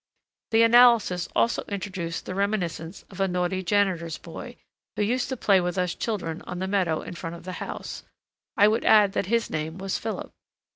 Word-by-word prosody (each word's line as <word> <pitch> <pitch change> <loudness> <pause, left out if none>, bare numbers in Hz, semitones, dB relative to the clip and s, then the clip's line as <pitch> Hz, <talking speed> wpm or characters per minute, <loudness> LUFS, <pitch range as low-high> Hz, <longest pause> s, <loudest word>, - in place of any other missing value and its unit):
The 225 0 +5
analysis 230 -7 +5
also 235 - +2
introduced 190 -4 -4
the - - -5
reminiscence 185 -4 -2
of 190 - -11
a 195 - +2
naughty 180 +1 -1
janitor's 180 -4 0
boy, - - -9 0.4
who 210 - 0
used 245 +5 0
to 260 - -3
play 195 -4 +4
with 180 +1 -2
us 180 -1 0
children 175 -8 -3
on 180 - -5
the 185 - -2
meadow 185 -5 0
in - - -7
front 170 -1 -6
of 170 - -12
the 185 - -6
house; - - -6 0.6
I 205 -1 +7
would 220 +2 +1
add 210 -3 +5
that 185 - -1
his 230 +2 0
name 155 +2 -3
was 195 0 -3
Philip. 220 -1 -5
190 Hz, 190 wpm, -26 LUFS, 175-210 Hz, 0.6 s, I